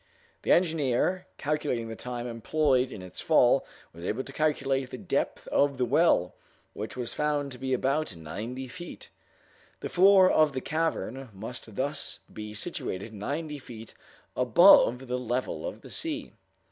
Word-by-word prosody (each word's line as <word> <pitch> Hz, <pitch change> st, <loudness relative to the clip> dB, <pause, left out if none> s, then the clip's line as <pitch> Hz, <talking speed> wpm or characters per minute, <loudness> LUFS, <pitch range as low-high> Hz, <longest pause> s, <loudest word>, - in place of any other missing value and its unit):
The -, -, 0 dB
engineer, 165 Hz, +1 st, +2 dB
calculating 145 Hz, -6 st, -1 dB
the 110 Hz, -, -6 dB
time 120 Hz, +1 st, -5 dB
employed 130 Hz, +2 st, +1 dB
in 95 Hz, -, -8 dB
its 90 Hz, -, -8 dB
fall, -, -, +4 dB, 0.3 s
was 85 Hz, +1 st, -11 dB
able 115 Hz, +8 st, -2 dB
to 135 Hz, -, -11 dB
calculate 135 Hz, -4 st, 0 dB
the -, -, -6 dB
depth -, -, -2 dB
of 140 Hz, -1 st, +2 dB
the 125 Hz, -, +1 dB
well, 135 Hz, -, +3 dB, 0.4 s
which 105 Hz, +3 st, -6 dB
was 125 Hz, -2 st, -4 dB
found 145 Hz, -2 st, 0 dB
to 125 Hz, -, -9 dB
be 130 Hz, 0 st, -3 dB
about 135 Hz, -, 0 dB
ninety 110 Hz, +11 st, -6 dB
feet. 175 Hz, +7 st, -9 dB, 0.7 s
The -, -, -5 dB
floor 190 Hz, +1 st, +7 dB
of 155 Hz, -5 st, +4 dB
the 130 Hz, -, -1 dB
cavern 135 Hz, -5 st, -2 dB
must 110 Hz, +2 st, -8 dB
thus 140 Hz, +4 st, -3 dB
be 105 Hz, 0 st, -7 dB
situated 100 Hz, +1 st, -5 dB
ninety 145 Hz, +8 st, -4 dB
feet 115 Hz, -4 st, -11 dB, 0.4 s
above 125 Hz, -, +6 dB
the 125 Hz, +1 st, -1 dB
level 125 Hz, -, -2 dB
of -, -, -7 dB
the -, -, -12 dB
sea. 310 Hz, -2 st, -4 dB
130 Hz, 155 wpm, -28 LUFS, 115-150 Hz, 0.7 s, floor